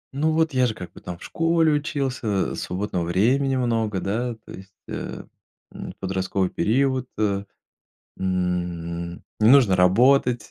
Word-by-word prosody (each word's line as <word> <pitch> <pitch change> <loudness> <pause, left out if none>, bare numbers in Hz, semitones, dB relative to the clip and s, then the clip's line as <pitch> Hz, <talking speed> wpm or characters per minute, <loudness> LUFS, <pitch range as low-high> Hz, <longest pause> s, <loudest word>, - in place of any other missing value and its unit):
Ну, 155 +3 +1
вот 160 -1 +1
я 130 -1 +3
же 110 - -3
как 90 - -8
бы - - -13
там 90 -1 -7
в - - -14
школе 165 -1 +2
учился, 135 - -1
свободного 95 -1 -3
времени 125 +11 +2
много, 115 -5 0
да, 115 +5 -2
то - - -12
есть, 95 0 -12 0.2
э, - - -6 0.5
м, - - -7
подростковый 95 0 -1
период. 130 +2 +1 0.9
М, 85 -2 -3 0.2
не 110 +1 +5
нужно 125 -8 +6
работать, 120 +5 +4
110 Hz, 135 wpm, -23 LUFS, 95-135 Hz, 0.9 s, нужно